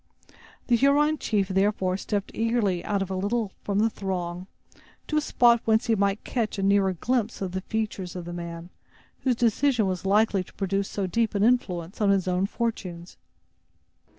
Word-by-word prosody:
The 240 - +3
Huron 290 +4 +3
chief, 200 -3 0
therefore, 190 -1 +1
stepped 200 +1 -3
eagerly 225 -6 0
out 200 -2 -1
a 190 - -4
little 205 +2 -1
from 200 -1 -2
the 215 +2 +4
throng, 180 -2 -4 0.6
to 305 - -1
a - - +3
spot 235 -5 +4
whence 220 +1 +3
he 230 - +2
might 200 -1 +1
catch 225 -4 -2
a 195 - -2
nearer 195 -1 +3
glimpse 235 +4 -1
of 190 -2 -3
the 190 +1 -3
features 210 -4 -3
of 180 -2 -6
the 175 - -6
man, 170 0 -7 0.5
whose 255 -2 +1
decision 240 0 +2
was 185 -2 -2
likely 200 0 +2
to - - -19
produce 195 0 -1
so 200 - -2
deep 220 +4 0
an 200 - +2
influence 195 -6 0
on 205 - +3
his 195 -2 +2
own 185 +1 +1
fortunes. 185 -7 -4
200 Hz, 180 wpm, -26 LUFS, 185-225 Hz, 0.6 s, the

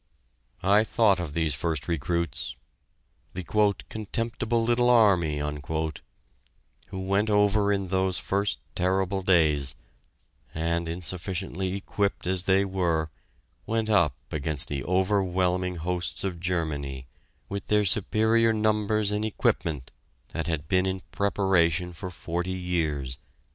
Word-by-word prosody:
I 100 +3 +5
thought 110 -4 +3
of 85 -5 -4
these 80 -2 +1
first 75 +1 -2
recruits 85 -1 -2 0.8
the 90 - -4
"contemptible 110 +4 0
little 120 +1 +3
army" 95 -10 +4 1.5
who 95 - -6
went 100 +3 +1
over 105 0 +3
in 100 -2 -1
those 95 0 +1
first 100 +1 -1 0.2
terrible 95 +1 0
days, 75 - +3 0.8
and, 85 +1 -1
insufficiently 90 +2 -3
equipped 100 0 -2
as 90 0 +2
they 95 +1 +4
were, 85 -5 0 0.6
went 110 -1 0
up 80 -10 +3 0.2
against 75 -1 0
the 70 -3 -3
overwhelming 90 -1 +1
hosts 90 +1 -3
of 90 -3 -3
Germany 75 -7 -2 0.4
with 100 -1 -5
their 105 -1 +3
superior 110 +3 +3
numbers 105 -1 +1
and 105 +1 -1
equipment 80 -9 -1 0.4
that 80 0 -4
had 80 -2 -2
been 95 +2 +2
in 95 -1 -3
preparation 90 -4 +1
for 90 +2 -6
forty 90 +1 -3
years.... 80 -8 -2
95 Hz, 115 wpm, -27 LUFS, 85-100 Hz, 1.5 s, I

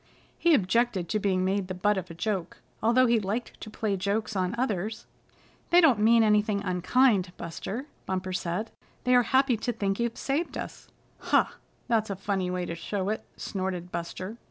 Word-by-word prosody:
He 340 -2 +5
objected 210 -3 +1
to 215 - +1
being 185 -2 +1
made 195 0 0
the 185 - -4
butt 205 +3 +2
of 185 -1 -4
a 165 - -8
joke, 190 0 -2 0.2
although 240 +3 +4
he 235 -2 +3
liked 215 +4 -4
to - - -7
play 210 -1 -1
jokes 205 +3 -1
on 185 +2 0
others. 220 -3 -2 0.6
"They 350 - +7
don't 290 - +5
mean 225 +2 +5
anything 210 -1 +2
unkind, 185 +2 +2
Buster," 195 - -5 0.2
Bumper 185 0 -2
said. 180 +5 -2 0.3
"They 250 - +3
are 245 - +7
happy 260 0 +3
to 240 +3 -2
think 200 -3 -2
you've 235 -1 -1
saved 290 +5 -2
us." - - -7 0.3
"Huh! - - +3 0.4
That's 225 -3 +1
a 200 - -2
funny 190 -1 -1
way 180 0 -2
to 170 - -4
show 190 +3 -3
it," 220 - -2
snorted 185 -2 -4
Buster. 185 +5 -5
205 Hz, 180 wpm, -28 LUFS, 185-230 Hz, 0.6 s, They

